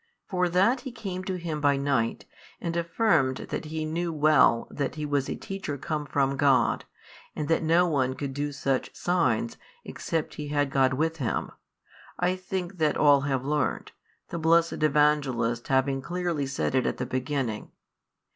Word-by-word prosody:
For 180 -2 0
that 195 +9 +3
he 260 +1 -7
came 195 -6 -5
to 190 - -2
Him 165 -4 -4
by 145 -1 +3
night, 135 -5 0 0.3
and 170 0 -3
affirmed 170 - +2
that - - -3
he 155 0 -3
knew 170 +2 -2
well 150 -6 +4
that 140 0 -3
He 150 -1 -3
was 145 -2 0
a - - -2
teacher 195 -7 -5
come 150 +1 -3
from 140 -1 +1
God 135 -4 +3 0.5
and 150 - -3
that 165 - +3
no 165 +2 +4
one 130 -5 0
could 140 -1 -4
do 145 +1 -2
such 135 -2 -2
signs, 130 -11 0 0.3
except 165 -2 -3
he 150 - -5
had 145 -1 0
God 130 -1 +3
with 160 +3 0
him, 125 -8 -2 0.7
I 180 +1 +1
think 185 0 -5
that 155 -2 +2
all 145 -2 +5
have 135 -2 -1
learnt, 150 +1 -1 0.4
the 170 - -4
blessed 165 0 +3
Evangelist 140 -6 +2
having 135 0 +1
clearly 175 -3 -2
said 135 -1 -2
it 130 -1 +2
at - - -2
the 125 - -2
beginning. 130 -4 -3
150 Hz, 170 wpm, -27 LUFS, 135-170 Hz, 0.7 s, all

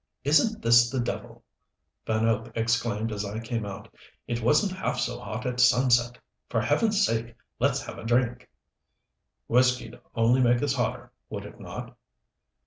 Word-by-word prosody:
"Isn't 155 +10 +2
this 120 +1 +6
the 130 - -2
devil?" 120 - -5 0.6
Van 110 0 +1
Hope 115 0 0
exclaimed 115 -1 0
as 105 -1 -3
I 105 +2 -4
came 115 -2 -3
out. 100 - -9 0.3
"It 120 -1 -2
wasn't 150 - +3
half 185 - -2
so - - -2
hot 110 +4 -6
at 125 -1 -2
sunset. 125 -1 +4 0.3
For - - 0
Heaven's 215 -3 +2
sake 115 0 -2 0.2
let's - - +1
have - - -8
a - - -9
drink." 120 +1 0 1.0
"Whiskey'd 125 +1 +1 0.2
only 120 +3 +3
make 120 +1 +3
us 145 -2 +1
hotter, 120 -4 -2 0.2
would - - -6
it - - -12
not?" - - -8
120 Hz, 155 wpm, -27 LUFS, 115-125 Hz, 1.0 s, this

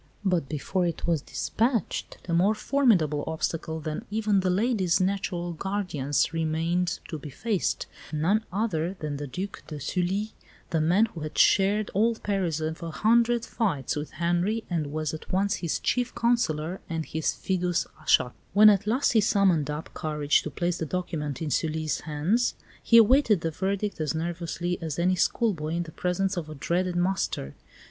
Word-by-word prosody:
But 175 -7 +1
before 175 +4 -1
it 170 - -4
was 165 -4 +1
dispatched 230 - -1
a 170 - -1
more 190 +6 +3
formidable 205 - +2
obstacle 160 0 -2
than 155 +6 -4
even 210 -1 +1
the 185 -1 +1
lady's 190 -3 +2
natural 185 -2 -1
guardians 165 -6 -1
remained 165 +2 0
to 155 - -4
be 145 - -8
faced 200 - -1 0.3
none 175 +8 +1
other 185 -3 -1
than 150 -2 -3
the 145 0 -5
Duc 190 +9 -5
de 150 -2 -6
Sully, 185 +8 -1 0.4
the 160 - +2
man 180 +8 +4
who 195 -7 -9
had 155 0 -6
shared 205 +2 +4
all 225 +4 +3
the - - -17
perils 185 -6 -1
of 160 +1 -3
a 170 - -4
hundred 235 +6 +2
fights 165 - -1
with 150 0 -5
Henri 175 +8 0
and 155 -4 -1
was 155 0 -2
at 155 - -8
once 195 +2 +1
his 170 -3 -1
chief 245 -1 -1
counsellor 185 -8 0
and 160 -1 -2
his 160 0 -1
fidus 180 -2 0 0.2
Achates. 125 - +3 0.2
When 210 +2 +8
at 205 +1 0
last 250 +6 +2
he 225 - +4
summoned 190 -8 +3
up 150 +2 -5
courage 150 -2 +1
to - - -5
place 175 +4 -2
the 160 - -2
document 160 -4 -3
in 150 - -3
Sully's 155 +1 0
hands, 165 +11 0 0.3
he 230 - +5
awaited 230 - +5
the 165 - -1
verdict 195 +2 -2
as 155 +1 -1
nervously 170 +1 -3
as 160 -3 -4
any 180 +2 +2
schoolboy 175 -5 0
in 175 - 0
the 165 - -10
presence 185 +3 -1
of 160 -3 -4
a 155 - -7
dreaded 175 +5 -1
master. 175 - -1
175 Hz, 175 wpm, -27 LUFS, 155-200 Hz, 0.4 s, When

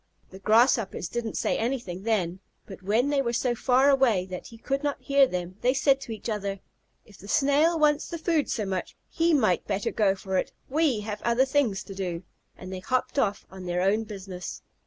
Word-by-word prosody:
The 190 - -11
Grasshoppers 220 -4 +2
didn't 235 -2 -3
say - - 0
anything 230 -7 -3
then, 190 -5 0 0.3
but 195 -1 -11
when 220 +8 +1
they 285 -1 +2
were 235 -3 -1
so 245 +1 +1
far 255 +3 +3
away 240 -9 +3
that 180 - -6
he 230 - -13
could 275 +4 -2
not 290 -1 -2
hear 275 -1 +4
them, 180 -2 -5
they 255 +2 +2
said 275 0 +3
to 240 - -7
each 220 - -6
other, 200 -3 -3 0.5
"If 205 -3 -18
the 200 - -12
Snail 290 +7 +3
wants 300 -1 +2
the 335 - -5
food 320 -2 0
so 215 - -1
much, 190 -2 -4 0.2
he 335 0 +2
might 215 -10 +2
better 200 -1 -1
go 200 -3 +2
for 190 0 -3
it. - - -4
We 285 -6 +1
have 210 0 -5
other 235 +3 +3
things 265 -8 +1
to 195 - -9
do," 180 -3 -4 0.3
and 185 +1 -8
they 185 - -4
hopped 255 +7 -1
off 205 -5 0
on 190 -1 -9
their 175 +1 0
own 210 +4 +2
business. 190 -3 -7
220 Hz, 210 wpm, -27 LUFS, 190-270 Hz, 0.5 s, hear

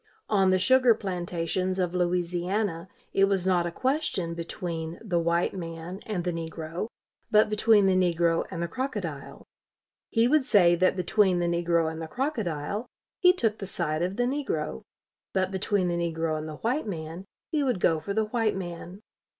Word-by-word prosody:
On 195 -3 +4
the 185 - +4
sugar 250 +4 +5
plantations 185 -1 -2
of 180 -2 0
Louisiana 180 +1 -1 0.3
it 195 - +5
was 195 -2 0
not 180 -2 +2
a - - -4
question 255 - -1
between 170 -1 -5
the 185 -6 -1
white 170 +1 +1
man 170 0 -6
and 200 -5 -2
the 175 - -1
negro, 165 +3 -4 0.4
but 215 -1 +4
between 215 -1 +4
the 190 - +4
negro 170 -2 +2
and 170 -3 -4
the - - -1
crocodile. 190 - -5 0.6
He 230 0 +3
would 300 +2 +4
say 195 -8 +5
that 185 +2 +2
between 185 +1 +2
the 175 - 0
negro 170 -1 +1
and 160 0 -7
the 160 - -5
crocodile, 210 - -2 0.3
he 360 -2 +7
took 225 - -1
the 195 - -5
side 160 -4 -2
of 180 +2 -1
the 245 - +1
negro; 245 - -2 0.5
but 190 -1 +1
between 195 0 0
the 175 - 0
negro 165 -2 -1
and 155 0 -4
the 155 - -6
white 250 +4 -1
man, 165 0 -6 0.3
he 305 -3 +1
would 250 -8 0
go 165 -2 +3
for 200 +5 -4
the 220 0 +2
white 220 -1 0
man. 180 +2 -7
180 Hz, 175 wpm, -27 LUFS, 170-210 Hz, 0.6 s, he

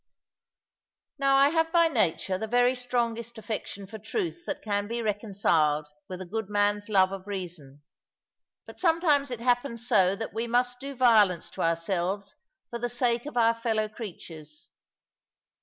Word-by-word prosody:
Now 275 -1 +3
I 275 +1 +6
have 325 +1 +1
by 335 -1 +5
nature 190 - 0
the 220 - -3
very 245 +2 +3
strongest 235 -2 -2
affection 215 -2 -5
for 220 +3 -9
truth 345 - -4
that 295 - -4
can 205 -1 -1
be 235 +2 -3
reconciled 195 -8 +1 0.2
with 185 -1 -6
a - - -5
good 215 +3 -4
man's 205 0 +1
love 190 -2 +4
of 195 0 -7
reason. 165 -8 -7 0.8
But - - -13
sometimes 325 -5 +2
it 245 -2 -5
happens 245 -1 0
so 195 -5 +4
that 225 +2 -6
we 225 +2 -2
must 245 +1 +1
do 275 +1 -7
violence 215 -8 +4
to - - -6
ourselves 180 +4 -1 0.4
for 235 - -4
the 245 +1 -2
sake 240 +1 0
of 295 - -6
our 230 -1 +5
fellow 225 -2 -1
creatures. 165 -8 -10
225 Hz, 155 wpm, -27 LUFS, 195-245 Hz, 0.8 s, I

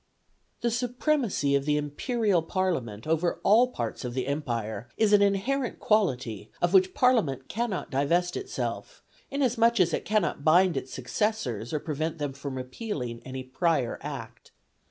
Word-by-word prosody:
The 235 - +1
supremacy 245 - 0
of 140 0 +2
the 150 0 +2
Imperial 190 - 0
Parliament 160 - -2
over 165 +2 0
all 230 +5 +6
parts 115 - -4
of 125 -1 -4
the 130 -1 -1
Empire 120 -6 -3
is 215 -2 +3
an 205 - +7
inherent 225 +6 +1
quality 130 - 0
of 175 +1 +1
which 190 -1 +4
Parliament 195 - +2
cannot 230 -3 -3
divest 170 +6 +1
itself, 400 +5 -4 0.3
inasmuch 235 -4 +2
as 170 -3 +3
it - - -1
cannot 210 -8 0
bind 175 +3 +5
its 130 - -4
successors 130 - -2
or 155 - 0
prevent 155 +2 -3
them 145 -3 -3
from 140 0 -6
repealing 130 - -5
any 130 0 -6
prior 130 -1 0
Act. - - -8
165 Hz, 150 wpm, -27 LUFS, 130-215 Hz, 0.3 s, an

